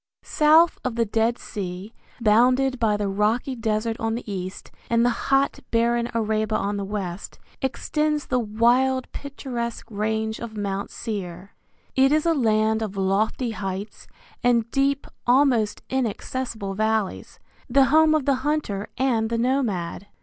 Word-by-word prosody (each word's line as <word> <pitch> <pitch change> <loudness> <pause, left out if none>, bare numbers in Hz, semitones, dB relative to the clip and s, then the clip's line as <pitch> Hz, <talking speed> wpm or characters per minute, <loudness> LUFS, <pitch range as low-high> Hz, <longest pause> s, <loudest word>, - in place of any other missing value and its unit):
South 315 +2 +4
of 255 -3 -2
the 230 0 +2
Dead 225 +3 +1
Sea, 190 +2 -6 0.3
bounded 250 +4 +3
by 215 -2 +2
the 205 -1 -1
rocky 215 +7 0
desert 225 0 -1
on 225 0 -1
the 240 - -5
east 185 -2 -6 0.2
and 235 0 +3
the 245 - +3 0.2
hot 275 0 +2
barren 235 +1 +1
Arabah 215 -1 0
on 205 +1 -2
the 200 - -3
west, 195 -2 -5 0.2
extends 300 +3 -1
the 255 - 0
wild 245 +4 +2
picturesque 250 -4 -5
range 220 +1 -2
of 225 -2 -7
Mount 200 -1 -3
Seir. 190 -4 -6 0.4
It 270 +1 +4
is 310 +1 +2
a 335 - +4
land 220 -4 +2
of 205 -3 -4
lofty 205 +5 0
heights 195 0 -6 0.4
and 235 -2 +2
deep, 275 0 +1 0.2
almost 245 -5 +3
inaccessible 240 -4 -3
valleys, 215 -1 -1 0.3
the 270 +2 +5
home 315 0 +6
of 300 -4 0
the 275 -2 +2
hunter 265 -9 -2
and 235 -4 +1
the 230 - -1
nomad. 225 -8 -1
230 Hz, 145 wpm, -24 LUFS, 210-260 Hz, 0.4 s, home